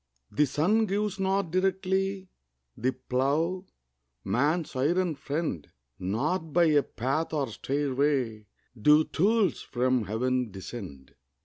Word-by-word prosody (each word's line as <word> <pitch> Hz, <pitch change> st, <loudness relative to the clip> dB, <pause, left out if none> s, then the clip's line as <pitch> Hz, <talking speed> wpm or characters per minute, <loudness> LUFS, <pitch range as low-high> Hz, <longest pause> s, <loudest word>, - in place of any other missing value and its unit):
The 150 Hz, 0 st, +2 dB
sun 205 Hz, -, +2 dB
gives 200 Hz, 0 st, -1 dB
not 190 Hz, -2 st, 0 dB
directly 190 Hz, +1 st, 0 dB, 0.5 s
The 130 Hz, +3 st, 0 dB
plough, 160 Hz, +9 st, -1 dB, 0.6 s
man's 145 Hz, -, 0 dB
iron 170 Hz, +6 st, +1 dB
friend; 140 Hz, -, -3 dB, 0.3 s
Not 150 Hz, -, -1 dB
by 175 Hz, -, +5 dB
a 145 Hz, -1 st, +5 dB
path 135 Hz, +6 st, -2 dB
or 140 Hz, -5 st, 0 dB
stairway 135 Hz, -4 st, -1 dB, 0.3 s
Do 150 Hz, +7 st, +5 dB
tools 200 Hz, +2 st, +1 dB
from 125 Hz, -2 st, 0 dB
Heaven 125 Hz, +4 st, 0 dB
descend. 95 Hz, -, -9 dB
150 Hz, 110 wpm, -28 LUFS, 125-185 Hz, 0.6 s, by